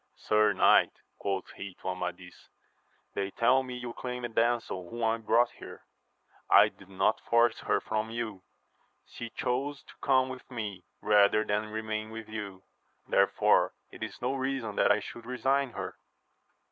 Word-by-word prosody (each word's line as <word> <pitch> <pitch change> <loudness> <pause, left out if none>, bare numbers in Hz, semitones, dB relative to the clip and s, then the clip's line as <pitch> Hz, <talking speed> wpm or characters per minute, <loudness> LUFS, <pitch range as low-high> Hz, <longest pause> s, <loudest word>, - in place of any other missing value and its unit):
Sir 105 0 +3
"knight, 95 - +5 0.3
quoth 95 -2 -3
he 95 -2 -8
to - - -5
Amadis, 90 -1 -6 0.6
they 100 -1 -2
tell 125 +6 +3
me 130 -1 -6
you 120 -1 -6
claim 125 0 -5
a - - -3
damsel 115 -6 0
whom 120 0 -5
I 115 0 +2
brought 115 +2 +3
here: - - -12 0.6
I - - +7
did 95 - -18
not 95 +3 +1
force 115 -1 +3
her - - +1
from 110 0 -2
j'^ou; 110 -4 -4 0.6
she 120 - -8
chose 135 +5 -2
to - - -15
come 130 -1 +3
with 130 -1 -9
me, 105 -7 -5 0.2
rather 105 0 +5
than 105 0 -1
remain 110 0 -3
with 110 0 -8
you, 100 -3 -6 0.4
therefore - - +3 0.2
it - - -13
is - - -5
no 125 +2 +1
reason 130 -5 -2
that - - +4
I 105 +1 +3
should 120 +2 -9
resign 130 +1 0
her. - - -6
110 Hz, 160 wpm, -30 LUFS, 105-125 Hz, 0.6 s, I